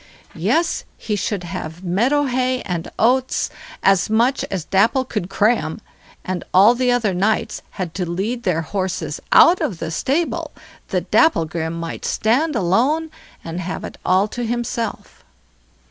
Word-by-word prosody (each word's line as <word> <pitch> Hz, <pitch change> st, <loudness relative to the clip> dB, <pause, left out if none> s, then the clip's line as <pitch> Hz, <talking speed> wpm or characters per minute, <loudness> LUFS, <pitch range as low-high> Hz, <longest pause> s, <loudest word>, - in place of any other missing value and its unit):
Yes! 335 Hz, +1 st, 0 dB
he 210 Hz, -, -2 dB
should 200 Hz, -2 st, -2 dB
have 175 Hz, -1 st, -6 dB
meadow 235 Hz, +12 st, +2 dB
hay 255 Hz, -1 st, 0 dB
and 175 Hz, -3 st, -4 dB
oats, 255 Hz, +3 st, +2 dB, 0.3 s
as 195 Hz, 0 st, +3 dB
much 235 Hz, +5 st, +2 dB
as 185 Hz, -5 st, -4 dB
Dapple 225 Hz, +7 st, +2 dB
could 210 Hz, -7 st, -4 dB
cram, 215 Hz, +5 st, +1 dB, 0.5 s
and 185 Hz, -1 st, -3 dB
all 200 Hz, +5 st, +7 dB
the 250 Hz, 0 st, 0 dB
other 230 Hz, -5 st, +1 dB
knights 215 Hz, +4 st, 0 dB, 0.2 s
had 180 Hz, -4 st, -3 dB
to 180 Hz, -3 st, -3 dB
lead 210 Hz, +8 st, -2 dB
their 175 Hz, -7 st, 0 dB
horses 185 Hz, +2 st, -3 dB
out 355 Hz, +1 st, +7 dB
of 255 Hz, -, -1 dB
the 160 Hz, 0 st, -4 dB
stable 285 Hz, -, -1 dB, 0.4 s
that -, -, -3 dB
Dapplegrim 165 Hz, -, +2 dB
might 165 Hz, 0 st, -5 dB
stand 270 Hz, +8 st, +1 dB
alone, 255 Hz, -, +1 dB, 0.3 s
and 165 Hz, +1 st, -5 dB
have 185 Hz, +1 st, -5 dB
it -, -, -8 dB
all 190 Hz, +3 st, +3 dB
to 245 Hz, -, -4 dB
himself. 235 Hz, -1 st, -4 dB
210 Hz, 145 wpm, -20 LUFS, 180-250 Hz, 0.5 s, all